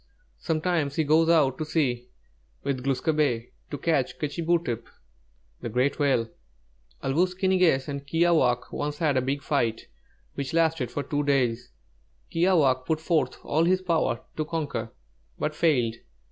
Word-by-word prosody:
Sometimes 160 -3 -1
he 160 - +2
goes 160 +2 +3
out 145 -6 +3
to - - 0
sea 125 -6 -1 0.6
with 130 -3 -2
Glūs 135 -1 -1
kābé, 145 -7 +1 0.2
to 145 - -4
catch 145 -3 0
'K'chī 150 +3 -3
būtep,' 165 -9 0 0.7
the 120 - -4
Great 125 +6 0
Whale. 135 -5 +2 0.8
"'Āl 135 - 0
wūs 180 +4 +1
ki 190 - 0
ni 185 0 +3
gess 145 -7 +3
and 140 -1 -5
'Kiāwāhq' 160 -7 +2
once 145 0 -3
had 150 -4 +1
a 130 - +3
big 135 +2 -2
fight, 115 -7 0 0.5
which 140 +2 -4
lasted 160 -6 +2
for 145 - -3
two 145 0 -1
days. 125 -4 +1 0.6
Kiāwāhq' 155 -8 +3
put 160 -1 +1
forth 160 0 0
all 160 +3 +1
his 185 +1 +2
power 165 -9 0 0.2
to 155 - 0
conquer, 155 -2 -3 0.5
but 155 - -2
failed. 130 -9 +2
145 Hz, 160 wpm, -26 LUFS, 130-165 Hz, 0.8 s, goes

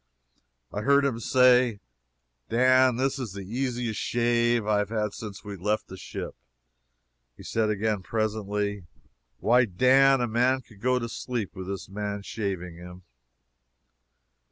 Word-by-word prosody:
I 105 - -2
heard 140 +4 +4
him 125 -5 -1
say: 125 -3 +4 0.7
"Dan, 130 +1 +4
this 135 +2 0
is 115 -7 -5
the 100 -1 -7
easiest 120 0 -2
shave 120 -1 +1
I 105 -1 +2
have 105 -1 -1
had 105 -2 -1
since 105 -4 -8
we 105 -2 -7
left 105 +4 -2
the 95 - -8
ship." 95 - -7 1.0
He - - -12
said 110 -1 0
again, 105 -1 0
presently: 105 -1 -2 0.5
"Why 120 +2 +4
Dan, 130 +7 +4
a 120 - 0
man 125 +3 +2
could 105 -5 -19
go 125 +1 +2
to 115 -2 -2
sleep 115 -2 -4
with 95 -1 -7
this 100 0 -5
man 100 +1 -4
shaving 95 -6 -4
him." 90 +1 -11
110 Hz, 145 wpm, -27 LUFS, 100-125 Hz, 1.0 s, heard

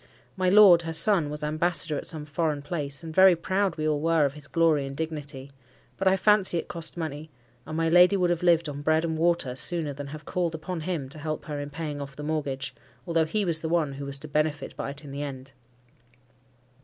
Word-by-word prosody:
My 185 -1 +1
lord, 190 -3 +7
her 165 -1 -5
son, 165 -2 +5
was 150 +1 -5
ambassador 155 0 0
at - - -5
some 155 -2 -5
foreign 150 -1 -2
place; 145 -2 -4
and 160 -1 -7
very 190 +1 +7
proud 190 +2 -1
we 155 -1 -2
all 150 -1 0
were 165 -2 +3
of 140 - -2
his 150 -1 -7
glory 160 -4 +2
and 135 0 -8
dignity; 145 -4 -5 0.4
but 195 - -1
I 190 0 +4
fancy 205 -3 +3
it - - -3
cost 170 0 -3
money, 155 -1 -5 0.4
and 155 - -5
my 165 0 +1
lady 180 +4 +6
would 180 -2 +1
have 170 - -1
lived 170 -2 +3
on 145 -1 -6
bread 155 +2 +2
and 160 -1 -2
water 165 -6 +1
sooner 160 +1 0
than 140 +1 -7
have 150 +1 -9
called 175 -3 -2
upon 165 +2 -5
him 155 -5 -3
to 155 - -7
help 155 +1 -4
her 150 -2 -5
in 145 0 -5
paying 150 -1 -5
off 140 -1 -8
the 150 - -8
mortgage, 140 -4 -3 0.3
although 165 -1 +1
he 205 +5 -1
was 165 -3 +1
the 160 - -4
one 160 -4 0
who 140 +1 -7
was 140 0 -3
to 155 - -9
benefit 150 -1 -2
by - - -4
it 140 +2 -8
in 140 - -9
the 140 +1 -5
end. 135 -2 -7
155 Hz, 230 wpm, -26 LUFS, 145-170 Hz, 0.4 s, lord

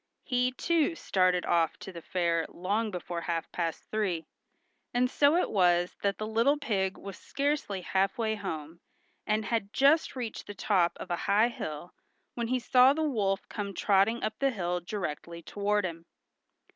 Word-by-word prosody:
He, 250 -1 +1
too, 330 +4 +1
started 185 - +1
off 165 -2 +2
to 190 - -9
the 170 -2 -9
fair 170 -2 0
long 205 +5 -1
before 175 -3 -5
half 165 -1 -3
past 165 -2 -3
three, 190 -7 -1 0.7
and 250 +1 +2
so 285 +2 +4
it 360 - +1
was 175 -3 +3
that 200 0 0
the 215 - -3
little 230 +7 +2
pig 195 -9 -1
was 195 -1 -9
scarcely 280 -9 -1
half 190 +2 0
way 220 -2 0
home, 165 -6 -6 0.5
and 215 0 +1
had 210 -2 -1
just 280 +5 +3
reached 240 -4 -5
the 205 - -7
top 185 -3 +1
of 180 - -7
a - - +2
high 215 +4 +5
hill, 155 -6 -6 0.4
when 235 -1 -2
he 255 +2 +1
saw 255 +2 +5
the 315 +2 -1
wolf 205 -9 0
come 200 -2 -5
trotting 205 +5 +2
up 215 0 -3
the 275 - +3
hill 180 -7 -2
directly 170 -2 -5
toward 205 +1 0
him. 165 -1 -6
200 Hz, 170 wpm, -29 LUFS, 175-235 Hz, 0.7 s, high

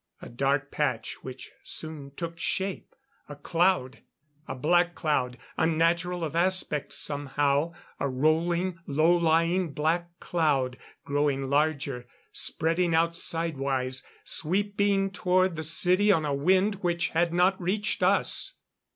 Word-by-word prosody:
A - - -10
dark 135 +3 0
patch 130 -7 -2
which 130 0 -9
soon 155 -3 -6
took 170 0 -5
shape. 190 +2 -3 0.3
A 145 - -7
cloud! 165 -3 0 0.5
A - - -4
black 175 +6 +2
cloud 130 -6 -1 0.2
unnatural 170 +2 +1
of 160 0 -4
aspect 175 -4 +1
somehow 145 +2 0 0.3
a 140 - -1
rolling, 170 +6 0
low 155 +4 +3
lying 165 0 +1
black 170 +4 -1
cloud. 140 -7 0 0.3
Growing 140 -2 0
larger; 140 -4 0 0.2
spreading 165 +1 +1
out 165 +1 +2
side 165 -2 -1
wise; 130 -1 -1 0.2
sweeping 200 +3 +1
toward 185 -2 +1
the 160 - -4
city 180 +6 +3
on 160 -5 +2
a 145 - -1
wind 185 +8 +2
which 175 -1 0
had 170 +1 +1
not 180 +2 +2
reached 205 +4 -1
us. - - +1
165 Hz, 125 wpm, -27 LUFS, 145-175 Hz, 0.5 s, low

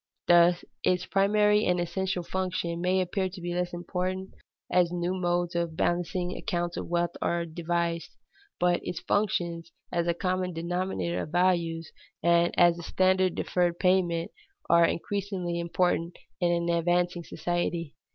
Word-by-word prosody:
_ - - -65
This, 175 0 +5 0.2
its 180 -1 +2
primary 210 +1 +3
and 180 0 +2
essential 180 +1 -2
function, 180 -2 -2
may 185 +1 +2
appear 185 +1 -1
to 185 +1 -10
be 175 0 -4
less 180 0 -1
important 185 +2 -3 0.4
as 180 -1 +3
new 175 +1 -1
modes 175 -1 0
of 170 -2 -1
balancing 175 +2 -1
accounts 175 -4 -2
of - - -4
wealth 175 0 0
are 170 0 0
devised. 170 0 -2 0.5
But 175 0 +3
its 175 -1 -4
functions 170 -5 -1 0.2
as 170 -1 0
a 170 - +1
common 185 0 -1
denominator 175 +1 -2
of - - -6
values 170 -2 +1 0.3
and 170 0 +4
as 175 -1 +5
a - - -6
standard 185 +1 +2
of - - -3
deferred 175 -1 +1
payment 175 -3 +1 0.4
are 170 0 +6
increasingly 185 -1 -2
important 170 0 0 0.2
in 175 -2 +2
an 170 0 0
advancing 175 +1 +1
society. 175 -2 -2
175 Hz, 150 wpm, -28 LUFS, 170-185 Hz, 0.5 s, are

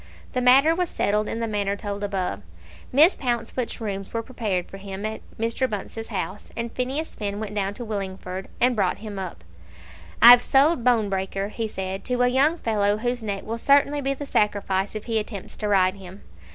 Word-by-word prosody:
The 250 - 0
matter 270 +6 +6
was 355 0 -1
settled 210 +1 0
in 230 - -3
the 230 - -1
manner 200 -2 -1
told 205 0 -5
above. 185 - -2 0.5
Miss 310 +8 +6
Pouncefoot's 240 -1 -2
rooms 195 -3 -4
were 230 0 -2
prepared 210 -8 -2
for 195 - -10
him 195 +1 -6
at 220 0 -4 0.2
Mr. 230 +3 0
Bunce's 220 +2 -5
house, 195 -1 -5
and 235 0 -3
Phineas 265 +6 -2
Finn 205 -1 -4
went 215 -1 -5
down 200 -1 -2
to 240 - -7
Willingford 190 -3 -5
and 250 0 +3
brought 195 -4 +1
him 210 -2 -7
up. 180 - -6 0.8
"I've 245 +1 +10
sold 275 +1 +3
Bonebreaker," 200 -4 +1
he 225 +1 -3
said, 190 -1 -5
"to 250 0 +1
a - - +4
young 280 +6 +3
fellow 210 -5 +1
whose 245 +2 -2
neck 200 -3 -4
will 230 +1 -4
certainly 285 +2 +3
be 275 0 -1
the 285 - -6
sacrifice 205 -4 0
if 215 - -5
he 225 -2 0
attempts 210 -2 -7
to 210 - -2
ride 190 -2 +3
him. 190 +1 -12
215 Hz, 190 wpm, -24 LUFS, 195-245 Hz, 0.8 s, I've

